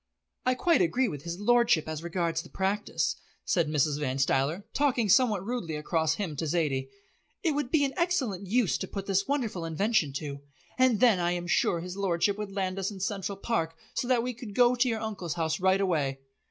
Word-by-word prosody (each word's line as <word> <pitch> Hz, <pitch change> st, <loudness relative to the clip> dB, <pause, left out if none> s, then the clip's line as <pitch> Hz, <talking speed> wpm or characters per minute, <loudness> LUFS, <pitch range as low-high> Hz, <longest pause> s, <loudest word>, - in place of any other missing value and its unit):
"I 255 Hz, -, +3 dB
quite 330 Hz, -, +3 dB
agree 210 Hz, +10 st, +2 dB
with 145 Hz, -9 st, -5 dB
his 170 Hz, +2 st, -5 dB
lordship 235 Hz, -7 st, +3 dB
as 155 Hz, -1 st, -4 dB
regards 170 Hz, -1 st, -1 dB
the -, -, -14 dB
practice," 195 Hz, +2 st, -1 dB, 0.3 s
said 170 Hz, -5 st, +2 dB
Mrs. 150 Hz, -1 st, +1 dB
Van 135 Hz, -3 st, -1 dB
Stuyler, 140 Hz, +7 st, +1 dB
talking 260 Hz, -6 st, +2 dB
somewhat 210 Hz, -4 st, +4 dB
rudely 225 Hz, -9 st, -3 dB
across 160 Hz, +1 st, 0 dB
him 175 Hz, -6 st, -3 dB
to 160 Hz, -, -2 dB
Zaidie. 145 Hz, -5 st, 0 dB, 0.5 s
"It 325 Hz, -, +2 dB
would 290 Hz, -3 st, -2 dB
be 285 Hz, -1 st, +3 dB
an 275 Hz, -, -3 dB
excellent 265 Hz, -, 0 dB
use 225 Hz, -1 st, +2 dB
to -, -, -4 dB
put 195 Hz, -1 st, -5 dB
this 195 Hz, 0 st, +1 dB
wonderful 240 Hz, -11 st, -1 dB
invention 165 Hz, -1 st, +1 dB
to. 140 Hz, 0 st, -5 dB, 0.4 s
And 255 Hz, -5 st, +3 dB
then, 230 Hz, -7 st, +5 dB
I 175 Hz, 0 st, +1 dB
am 175 Hz, 0 st, -3 dB
sure 175 Hz, -1 st, +1 dB
his 180 Hz, +2 st, -7 dB
lordship 195 Hz, 0 st, +1 dB
would 210 Hz, -1 st, -4 dB
land 190 Hz, -1 st, -2 dB
us 195 Hz, -, -1 dB
in 200 Hz, -2 st, -8 dB
Central 195 Hz, 0 st, -3 dB
Park, 165 Hz, -6 st, -1 dB, 0.2 s
so 245 Hz, -, -2 dB
that 245 Hz, -2 st, +2 dB
we 250 Hz, 0 st, -2 dB
could 225 Hz, -4 st, -9 dB
go 245 Hz, 0 st, +5 dB
to 250 Hz, +1 st, +2 dB
your 225 Hz, -2 st, -2 dB
Uncle's 200 Hz, -7 st, -4 dB
house 160 Hz, 0 st, -1 dB
right 190 Hz, +1 st, +3 dB
away." 150 Hz, -8 st, 0 dB
190 Hz, 205 wpm, -28 LUFS, 165-235 Hz, 0.5 s, then